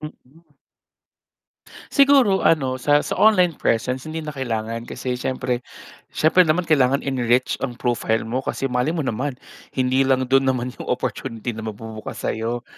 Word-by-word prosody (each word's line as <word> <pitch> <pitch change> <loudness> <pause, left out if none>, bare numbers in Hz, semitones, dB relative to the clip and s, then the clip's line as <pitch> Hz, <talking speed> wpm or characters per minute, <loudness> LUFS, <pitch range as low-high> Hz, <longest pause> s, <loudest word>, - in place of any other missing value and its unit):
Mm. 150 +1 -13 1.4
Siguro 275 -9 +4
ano 135 -5 +2
sa 145 +3 +3
sa - - -4
online 180 -7 +4
presence 125 +3 0
hindi 160 +1 -4
na 155 - -5
kailangan 115 -4 -4
kasi 125 0 -4
siyempre, 125 -1 -2 0.5
siyempre 170 +4 +4
naman 160 +3 +2
kailangan 140 -3 +3
enrich 125 -2 +1
ang 125 -3 -4
profile 120 -2 -1
mo 130 +3 -2
kasi 135 - -2
malay 125 +5 0
mo 165 - -1
naman, 130 +2 -2 0.4
hindi 130 +1 +2
lang 130 -1 +1
do'n 135 0 +4
naman 125 -2 0
yung - - -7
opportunity 120 -1 -3
na 110 - -6
magbubukas 110 0 -7
sa'yo. 115 +2 -2
130 Hz, 150 wpm, -22 LUFS, 120-150 Hz, 1.4 s, Siguro